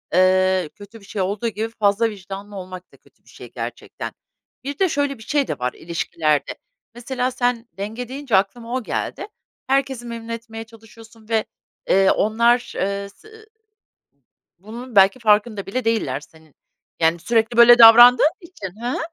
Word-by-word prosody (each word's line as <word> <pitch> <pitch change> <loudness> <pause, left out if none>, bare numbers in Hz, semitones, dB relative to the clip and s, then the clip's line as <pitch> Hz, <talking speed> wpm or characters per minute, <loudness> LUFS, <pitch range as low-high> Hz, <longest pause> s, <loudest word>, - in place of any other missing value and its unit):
ııı, 185 -2 +3
kötü 205 +2 -13
bir 200 - -18
şey 200 -1 -4
olduğu 200 +5 -2
gibi 220 +1 -3
fazla 210 +2 +2
vicdanlı 200 +1 -9
olmak 185 -1 -9
da - - -20
kötü - - -29
bir - - -23
şey - - -13
gerçekten. - - -7 0.5
Bir 280 +1 -6
de 380 -2 +3
şöyle 285 -3 -1
bir 220 - -13
şey 290 +1 0
de - - -4
var 125 0 -2
ilişkilerde, 160 -2 -2 0.4
mesela, 250 +1 -3
sen 245 -1 -1
denge 220 +5 -5
deyince 265 -4 -2
aklıma 230 +5 -1
o 255 - -2
geldi. 400 - -4 0.4
Herkesi 270 -2 0
memnun 230 -1 -8
etmeye 225 -1 -7
çalışıyorsun 225 0 -17
ve, 220 -1 +1 0.4
eee, 195 0 +4
onlar, 235 +3 +1
ııı, 200 +1 -3
se 430 - -21
ı 440 0 -16 1.1
bunun 230 +4 -10
belki 195 +6 +5
farkında 210 -2 +1
bile 250 +5 -3
değiller 150 - -1
senin, 160 -1 -20 0.5
yani, 165 +1 +2
sürekli 225 +5 0
böyle 240 0 +8
davrandığın 240 +5 +8
için 220 - -10
Hı 240 - -2
hı. - - -2
225 Hz, 165 wpm, -21 LUFS, 195-240 Hz, 1.1 s, böyle